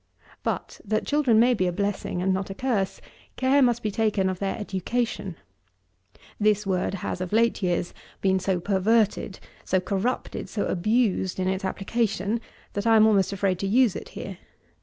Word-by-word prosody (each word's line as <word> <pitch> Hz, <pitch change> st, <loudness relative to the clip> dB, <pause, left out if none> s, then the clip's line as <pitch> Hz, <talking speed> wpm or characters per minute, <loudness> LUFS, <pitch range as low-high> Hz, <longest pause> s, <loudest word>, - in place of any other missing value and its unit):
But, -, -, -4 dB
that 215 Hz, +1 st, -1 dB
children 275 Hz, -7 st, +3 dB
may 245 Hz, +2 st, +5 dB
be 185 Hz, -6 st, +1 dB
a -, -, +1 dB
blessing 200 Hz, -1 st, -2 dB
and 190 Hz, 0 st, +2 dB
not 190 Hz, +1 st, -2 dB
a 195 Hz, -, -6 dB
curse, 220 Hz, -7 st, -1 dB, 0.3 s
care 265 Hz, +2 st, +3 dB
must 240 Hz, -2 st, +2 dB
be 215 Hz, -, 0 dB
taken 205 Hz, -3 st, +1 dB
of 185 Hz, -, -6 dB
their 195 Hz, -1 st, -2 dB
education. 220 Hz, +3 st, -2 dB, 1.0 s
This 210 Hz, -1 st, +2 dB
word 190 Hz, 0 st, 0 dB
has, -, -, -3 dB
of 185 Hz, -, -4 dB
late 230 Hz, +1 st, +2 dB
years, 175 Hz, -2 st, -1 dB, 0.3 s
been 190 Hz, -1 st, +2 dB
so 185 Hz, -1 st, 0 dB
perverted, 205 Hz, +2 st, +1 dB, 0.2 s
so 185 Hz, -, +1 dB
corrupted; 200 Hz, +6 st, -2 dB
so 205 Hz, -, -2 dB
abused, 195 Hz, -1 st, +1 dB
in 185 Hz, -, 0 dB
its 190 Hz, +1 st, -1 dB
application, 210 Hz, +2 st, -1 dB, 0.3 s
that 200 Hz, +2 st, -2 dB
I 225 Hz, -, +6 dB
am 215 Hz, -1 st, +7 dB
almost 200 Hz, -4 st, +3 dB
afraid 190 Hz, -2 st, 0 dB
to 195 Hz, -, -1 dB
use 230 Hz, 0 st, +3 dB
it -, -, -7 dB
here. -, -, -6 dB
200 Hz, 175 wpm, -25 LUFS, 190-225 Hz, 1.0 s, am